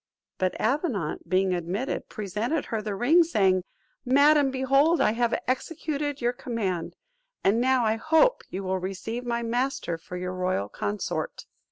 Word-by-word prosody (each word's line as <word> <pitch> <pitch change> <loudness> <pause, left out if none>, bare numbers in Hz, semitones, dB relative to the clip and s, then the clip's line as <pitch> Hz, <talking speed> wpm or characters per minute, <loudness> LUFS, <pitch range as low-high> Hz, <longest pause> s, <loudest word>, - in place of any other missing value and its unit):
But 185 -1 -1
Avenant 225 - -1
being 185 0 +2
admitted, 180 +8 -3
presented 215 - -2
her 220 -2 -2
the 210 -1 -3
ring, 285 - +5
saying, 195 - +2 0.4
"Madam, 285 +2 +5
behold 275 +5 +3
I - - +4
have 235 +1 0
executed 290 +1 -2
your 240 +1 +1
command; 220 -9 -3 0.5
and 215 +4 +3
now, 255 -1 +3
I 220 0 +1
hope, 320 - +3
you 195 - -5
will 190 0 -1
receive 195 +6 -4
my 235 0 -1
master 240 -7 -1
for 180 +2 -8
your 180 +1 -4
royal 185 - -1
consort." 105 0 -3
230 Hz, 150 wpm, -26 LUFS, 185-270 Hz, 0.5 s, ring